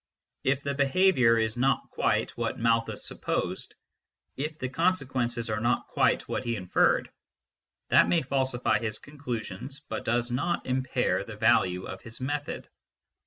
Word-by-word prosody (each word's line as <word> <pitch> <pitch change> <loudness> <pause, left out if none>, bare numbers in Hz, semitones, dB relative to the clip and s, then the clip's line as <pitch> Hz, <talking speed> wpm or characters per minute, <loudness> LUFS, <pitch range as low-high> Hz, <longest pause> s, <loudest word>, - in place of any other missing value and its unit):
If 130 +1 +1
the 140 - -1
behaviour 140 -4 +4
is 110 +1 0
not 135 +2 +1
quite - - 0
what - - -2
Malthus 115 0 +1
supposed, - - -3 0.6
if 150 +3 -4
the 130 - -3
consequences 130 -6 0
are 110 -1 -1
not 120 +2 +1
quite - - +2
what - - -2
he 120 -1 -1
inferred, 90 -4 +2 0.8
that - - +6
may 170 -3 +3
falsify 130 -2 +1
his 110 -3 -2
conclusions, 130 -2 -6
but 125 -7 -6
does 120 +1 0
not 170 +8 -1
impair 130 0 0
the - - -9
value 90 0 +3
of 95 - -7
his 115 -1 -10
method. 145 +3 -3
125 Hz, 145 wpm, -28 LUFS, 115-140 Hz, 0.8 s, that